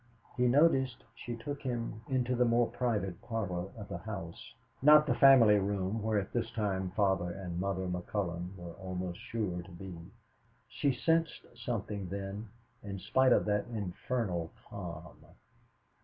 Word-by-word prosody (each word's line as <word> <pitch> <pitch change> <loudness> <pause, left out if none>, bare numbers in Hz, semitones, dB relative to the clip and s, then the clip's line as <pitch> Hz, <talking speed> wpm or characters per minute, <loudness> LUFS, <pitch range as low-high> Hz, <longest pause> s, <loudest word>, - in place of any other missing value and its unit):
He 125 0 +3
noticed 130 -2 +3
she 120 - -6
took 140 +5 -6
him 120 -4 -3
into 125 -1 +1
the 125 - +4
more 120 0 +3
private 105 -8 -1
parlor 95 -6 -3
of 105 - -7
the 95 -3 -5
house, 95 -3 -7 0.3
not 150 +2 +8
the - - +2
family 120 -7 +7
room 100 +2 -1
where 110 0 +1
at 100 -1 -2
this 115 -1 0
time 100 -5 -1
Father 95 -4 +2
and 90 -2 -5
Mother 95 0 -1
McCullon 90 0 -3
were 85 -2 -8
almost 90 -1 -5
sure 100 -6 -3
to 90 +2 -13
be. 90 +1 -8 0.7
She 140 - +1
sensed 165 +4 +1
something 105 -5 -3
then, 100 +2 -5 0.3
in 100 -1 -5
spite 130 +8 +3
of - - +4
that 105 0 0
infernal 100 -4 -2 0.2
calm. 85 -5 -8
105 Hz, 150 wpm, -32 LUFS, 95-120 Hz, 0.7 s, not